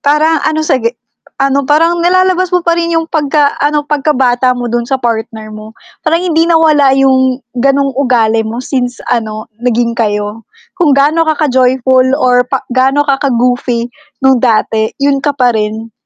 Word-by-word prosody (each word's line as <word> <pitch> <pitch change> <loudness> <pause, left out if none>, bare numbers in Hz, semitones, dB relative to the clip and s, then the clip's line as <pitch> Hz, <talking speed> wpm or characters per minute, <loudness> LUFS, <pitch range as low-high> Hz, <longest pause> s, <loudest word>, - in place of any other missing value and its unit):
parang 300 +2 +2
ano 315 0 -1
sige 240 -4 -1 0.4
ano 275 +1 +1
parang 330 +3 +2
nalalabas 370 +1 +2
mo 360 -1 0
pa 335 - +3
rin 335 0 -2
yung 325 - 0
pagka-ano, 295 -1 0
pagkabata 260 -4 +1
mo 245 - -3
dun 240 - 0
sa 270 - +1
partner 220 -2 -4
mo, 215 0 -10 0.3
parang 330 +1 +1
hindi 320 +1 +3
nawala 310 -4 +4
yung 260 -1 +2 0.2
ganung 275 +1 +1
ugali 235 -4 +1
mo 220 +1 -6
since 250 -1 -3
ano 215 -2 -3 0.2
naging 240 -1 0
kayo. 210 -1 -2 0.4
Kung 325 -4 +3
gaano 300 +4 +2
ka-joyful 260 -2 +2
or 250 -2 +3
pa 270 -1 -3
gaano 270 +3 +2
ka 275 -1 0
ka-goofy 245 -1 0 0.4
nung 265 -2 +4
dati, 220 -2 +1
yun 275 0 +1
ka 290 - +1
pa 250 -2 +2
rin, 220 +1 -3
260 Hz, 155 wpm, -11 LUFS, 240-295 Hz, 0.4 s, nawala